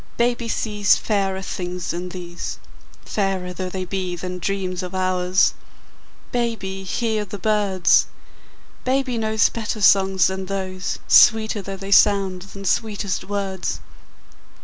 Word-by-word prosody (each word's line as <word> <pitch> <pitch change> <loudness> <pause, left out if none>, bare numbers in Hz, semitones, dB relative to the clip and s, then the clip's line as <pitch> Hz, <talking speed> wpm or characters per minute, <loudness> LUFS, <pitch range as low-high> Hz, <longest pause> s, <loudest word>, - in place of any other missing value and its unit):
Baby 235 0 +1
sees 210 -2 +2
Fairer 195 -3 -1
things 180 -1 -4
than 175 +1 -4
these, 175 -1 -6 0.5
Fairer 190 -3 -2
though 185 +1 -4
they 185 0 -4
be 185 -1 -3
than 180 +1 -5
dreams 185 -1 -2
of 180 0 -6
ours. 185 0 +2 0.8
Baby, 225 -6 -2
hear 220 +2 -1
the 205 0 -7
birds! 200 -2 +3 0.8
Baby 255 -2 0
knows 220 -1 +2
Better 225 -1 -4
songs 195 -2 +5
than 190 0 -2
those, 185 -1 -3
Sweeter 220 -2 +5
though 195 0 -6
they 195 +1 -7
sound 195 -3 +4
than 195 +1 -10
sweetest 205 -3 -1
words. 195 -2 -3
195 Hz, 125 wpm, -22 LUFS, 185-210 Hz, 0.8 s, songs